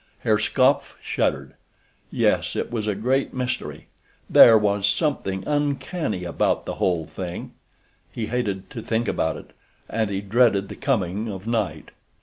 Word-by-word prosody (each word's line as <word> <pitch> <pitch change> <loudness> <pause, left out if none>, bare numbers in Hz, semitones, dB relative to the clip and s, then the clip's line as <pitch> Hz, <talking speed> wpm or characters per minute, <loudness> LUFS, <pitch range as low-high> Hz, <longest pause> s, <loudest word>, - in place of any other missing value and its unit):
Herr 110 -1 +2
Skopf 130 +5 +2
shuddered. - - -1 0.6
Yes, - - +1
it - - -3
was 110 -3 -2
a 105 - 0
great 130 +7 0
mystery—there 125 -2 +3
was 100 -1 +1
something 100 - -1
uncanny 145 - -1
about 85 - 0
the - - -5
whole 85 -4 +1
thing—he 90 +6 -9
hated 105 -6 -2
to 115 - -6
think 115 +2 -1
about 80 -1 0
it, - - -13 0.3
and 110 -2 -1
he 100 -1 -2
dreaded 100 -1 +2
the - - -7
coming 110 -5 -1
of 95 0 -8
night. 115 -3 -2
110 Hz, 135 wpm, -23 LUFS, 95-125 Hz, 0.6 s, mystery—there